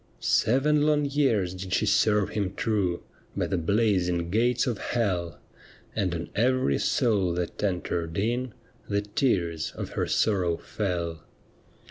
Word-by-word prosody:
Seven 145 +6 +2
long 150 -1 +3
years 135 -11 +1
did 95 -1 -6
she - - +2
serve 105 -2 +3
him 100 -3 -2
true 100 -7 0 0.3
By - - +1
the 95 - -1
blazing 90 -3 +1
gates 120 +3 +2
of 120 -6 -2
hell, 90 -8 -1 0.6
And 90 -3 0
on 85 0 -5
every 120 - +2
soul 100 -7 +1
that 90 +3 -4
entered 85 -4 -2
in 120 +3 -1 0.3
The 100 0 +1
tears 90 - 0
of - - -5
her - - -1
sorrow 90 -6 +1
fell. 85 -6 -3
100 Hz, 135 wpm, -27 LUFS, 85-115 Hz, 0.6 s, long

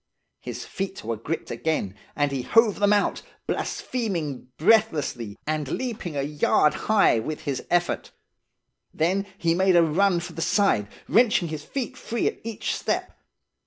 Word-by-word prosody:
His - - -6
feet 195 0 -5
were 115 +1 -2
gripped 145 +9 -4
again, 155 -12 -1 0.2
and 145 -1 +1
he 135 -2 -1
hove 225 - +3
them 205 0 +4
out, 205 -1 +2 0.2
blaspheming 170 - -3
breathlessly, 155 - +2
aud 155 -2 -1
leaping 215 - -4
a 140 - 0
yard 150 +1 +3 0.2
high 215 - +5
with 150 +7 -4
his 140 -3 -3
effort. 175 0 +1 0.8
Then 190 +5 0
he 170 -5 +2
made 185 +1 +3
a 170 - +7
run 175 +3 +3
for 170 - -7
the 165 - -5
side, 170 - +2 0.2
wrenching 215 -7 +3
his 155 -1 -5
feet 265 - -4
free 235 -4 -2
at - - -1
each 225 -2 -3
step. - - -2
170 Hz, 155 wpm, -25 LUFS, 150-205 Hz, 0.8 s, a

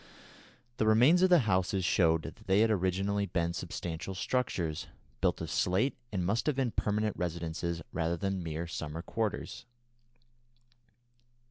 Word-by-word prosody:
The 110 - +1
remains 125 +11 +6
of 185 - +5
the 175 -4 +6
houses 95 -2 +1
showed 80 -3 +3
that - - -10
they 95 +2 +4
had 110 0 +4
originally 100 +1 0
been 85 -2 -1
substantial 85 +1 -5
structures, 90 -9 -1 0.3
built - - +1
of - - -4
slate, 95 +10 +1 0.2
and 95 -4 -1
must 110 - 0
have 150 - +2
been 130 -3 0
permanent 105 0 0
residences 85 -1 -3
rather 85 0 0
than 95 +1 -2
mere 80 0 -4
summer 80 -1 -5
quarters. 110 +2 -3
95 Hz, 140 wpm, -31 LUFS, 85-110 Hz, 0.3 s, remains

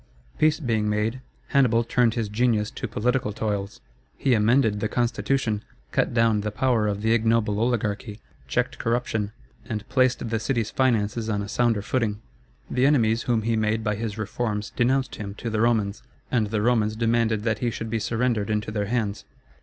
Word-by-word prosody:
Peace 155 0 +3
being 110 -7 0
made, 110 +4 -1 0.3
Hannibal 125 -4 +3
turned 115 -1 +2
his 115 -3 -1
genius 110 0 +1
to - - -5
political 125 0 0
toils. 100 -1 -3 0.4
He 135 - +2
amended 110 -1 +3
the 110 - 0
constitution, 115 -1 0 0.3
cut - - +1
down 115 -3 +3
the 105 - -2
power 115 0 +1
of 105 0 -2
the 110 +1 +3
ignoble 110 -2 +2
oligarchy, 110 -2 -1 0.3
checked 65 - -1
corruption, 115 -3 -1 0.4
and 105 -2 -4
placed 130 -2 +2
the 115 0 -1
city's 115 -2 -1
finances 115 -3 +1
on 100 -1 0
a - - -6
sounder 115 -1 +1
footing. 110 -3 -1 0.5
The 130 +2 +2
enemies 115 -5 +3
whom 115 -2 +2
he 115 +1 +1
made 110 0 0
by 105 -1 0
his 105 0 -4
reforms 110 -1 -3
denounced 130 +2 +1
him 100 -1 -6
to 115 +2 -5
the 110 -1 0
Romans, 110 -3 +1 0.3
and 115 -4 +2
the 105 0 -1
Romans 110 -3 +2
demanded 115 -2 +1
that 110 -1 0
he 120 - 0
should 110 -1 -5
be 115 - 0
surrendered 115 -1 0
into 105 0 -1
their 105 -2 -2
hands. 110 -3 -1
110 Hz, 175 wpm, -25 LUFS, 105-120 Hz, 0.5 s, Peace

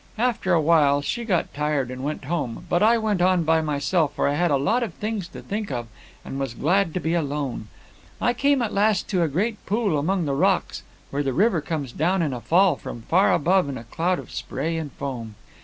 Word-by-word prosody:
After 230 -5 0
a 170 - +5
while 145 -3 +3
she 240 +10 -2
got 185 -6 0
tired 145 -3 -1
and 130 +1 -6
went 150 +1 -3
home, 135 -6 -3
but 175 - +1
I 225 +2 +5
went 215 -5 0
on 180 -1 +3
by 160 0 +3
myself, 150 +1 0
for - - +1
I 140 - +1
had 175 +4 +1
a 140 - +3
lot 215 - +1
of 220 -9 -3
things 210 -4 -3
to - - -11
think 210 -4 -4
of, 120 -2 -3 0.4
and 135 - -5
was 135 -4 -3
glad 170 +5 +1
to - - +1
be 160 0 -1
alone. 145 -8 -2 0.5
I 240 - +2
came 275 +1 +2
at 220 - -3
last 205 -1 +2
to 185 -3 +1
a 165 - +3
great 205 +9 -2
pool 205 -7 +1
among 180 +3 0
the 140 - -1
rocks, 185 +6 +1 0.3
where 140 - -1
the 135 -2 -1
river 190 - +2
comes 145 -5 -4
down 175 +6 +1
in 145 -4 -1
a 120 - -5
fall 175 - +3
from 115 - -8
far 185 - +3
above 180 0 +2
in 135 - -4
a 115 - -8
cloud 170 +9 -1
of - - -9
spray 160 +5 -3
and 160 -3 -4
foam. 120 -6 -6
165 Hz, 230 wpm, -24 LUFS, 140-195 Hz, 0.5 s, a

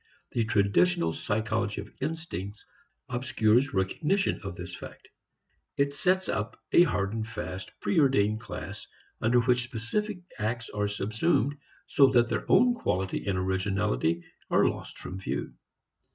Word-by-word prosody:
The 115 -2 +1
traditional 90 -6 +3
psychology 110 +1 -1
of 100 - -7
instincts 110 - -4 0.4
obscures 120 +1 +2
recognition 150 - +1
of 95 -3 -5
this 90 0 -7
fact. - - -11 0.7
It 140 0 +2
sets 185 +5 +1
up 105 - -2
a - - +7
hard 100 - +2
and 110 -1 -3
fast 95 -4 -6
preordained 130 - +3
class - - -7 0.3
under 120 +2 +4
which 125 0 +3
specific 180 - -3 0.2
acts 115 +2 -2
are 105 0 0
subsumed, 110 - +1 0.3
so 140 - +5
that 120 -1 +4
their - - -2
own 245 0 +6
quality 95 - -2
and 95 -2 +1
originality 95 - 0 0.3
are - - +4
lost - - -4
from 95 - -7
view. 95 - -3
110 Hz, 135 wpm, -28 LUFS, 95-135 Hz, 0.7 s, a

